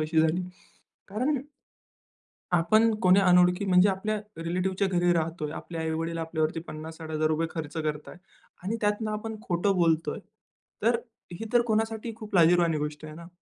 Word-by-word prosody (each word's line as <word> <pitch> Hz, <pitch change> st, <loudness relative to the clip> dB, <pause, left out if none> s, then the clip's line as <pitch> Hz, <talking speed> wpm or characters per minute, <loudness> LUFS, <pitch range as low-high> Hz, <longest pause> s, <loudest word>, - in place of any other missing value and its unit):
अशी 160 Hz, +1 st, +2 dB
झाली. 160 Hz, +3 st, +2 dB, 0.7 s
कारण 255 Hz, +6 st, 0 dB, 1.1 s
आपण 215 Hz, +7 st, +4 dB
कोणी 185 Hz, +2 st, +6 dB
अनोळखी 180 Hz, +1 st, +4 dB
म्हणजे 185 Hz, +1 st, +5 dB
आपल्या 210 Hz, +3 st, -1 dB, 0.3 s
रिलेटिव्हच्या 185 Hz, +3 st, 0 dB
घरी 175 Hz, -1 st, +2 dB
राहतोय. 165 Hz, -2 st, -2 dB
आपल्या 165 Hz, 0 st, -6 dB
आई-वडील 165 Hz, +1 st, -2 dB
आपल्यावरती 160 Hz, 0 st, -1 dB
₹50,000-₹60,000 155 Hz, 0 st, -2 dB
खर्च 155 Hz, -3 st, -6 dB
करतायत 150 Hz, +1 st, -4 dB, 0.5 s
आणि 220 Hz, +5 st, -1 dB
त्यातनं 210 Hz, +1 st, 0 dB
आपण 220 Hz, +1 st, -4 dB
खोटं 180 Hz, +3 st, +1 dB
बोलतोय. 165 Hz, -2 st, +1 dB, 0.6 s
तर 235 Hz, +1 st, +3 dB, 0.4 s
ही 175 Hz, -, -6 dB
तर 240 Hz, -1 st, +5 dB
कोणासाठी 225 Hz, +1 st, -1 dB
खूप 215 Hz, -3 st, -10 dB
लाजिरवाणी 170 Hz, -2 st, +4 dB
गोष्ट 150 Hz, +1 st, -4 dB
आहे 155 Hz, -, -8 dB
ना. 170 Hz, +1 st, -11 dB
175 Hz, 140 wpm, -27 LUFS, 160-205 Hz, 1.1 s, कोणी